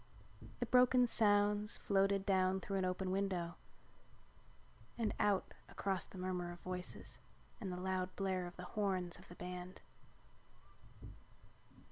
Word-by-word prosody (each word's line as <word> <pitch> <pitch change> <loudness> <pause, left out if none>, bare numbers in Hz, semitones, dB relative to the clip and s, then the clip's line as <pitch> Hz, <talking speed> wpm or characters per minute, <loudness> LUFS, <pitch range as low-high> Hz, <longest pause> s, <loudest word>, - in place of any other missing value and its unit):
The - - 0
broken 250 0 +6
sounds 205 -1 +3
floated 195 0 +2
down 190 -1 +3
through 195 +1 -2
an 185 - +1
open 185 0 -1
window 185 -3 0 1.4
and 225 -3 0
out 200 -2 +2 0.2
across 195 -2 -1
the - - -12
murmur 180 -1 -2
of 175 - -9
voices 180 0 -4 0.4
and 195 -4 -4
the 180 - -3
loud 185 0 -1
blare 185 -2 -1
of 175 - -10
the 180 - -7
horns 190 -4 -1
of - - -15
the 175 - -11
band. 180 +1 -7
190 Hz, 130 wpm, -38 LUFS, 180-200 Hz, 1.4 s, broken